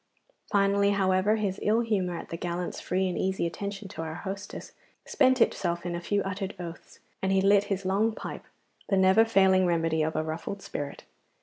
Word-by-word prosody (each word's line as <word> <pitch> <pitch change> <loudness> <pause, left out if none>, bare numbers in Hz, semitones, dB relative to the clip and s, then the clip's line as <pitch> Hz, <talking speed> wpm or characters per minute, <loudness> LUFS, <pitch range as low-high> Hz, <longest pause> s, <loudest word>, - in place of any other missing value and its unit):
Finally, 200 0 +3
however, 190 +1 +2
his 205 -3 -2
ill 220 +3 +2
humour 190 -7 -1
at - - -8
the - - -4
gallant's 175 +1 -4
free 185 +1 0
and 180 - -2
easy 190 -2 0
attention 200 +4 -5
to 170 - -7
our 160 -1 -5
hostess 195 +2 -7 0.3
spent 260 -2 +3
itself 175 -6 +1
in 175 - -2
a 170 - -3
few 200 +3 0
muttered 195 0 -4
oaths, 170 -1 -9 0.2
and 190 - 0
he 195 - +4
lit 200 +1 +4
his 195 -1 -3
long 200 +4 +2
pipe, - - -7 0.4
the 195 - +3
never 190 +3 +6
failing 190 -4 +4
remedy 165 -2 +1
of 155 +1 -1
a 155 - 0
ruffled 165 +5 -5
spirit. 145 -1 -6
190 Hz, 190 wpm, -28 LUFS, 175-200 Hz, 0.4 s, never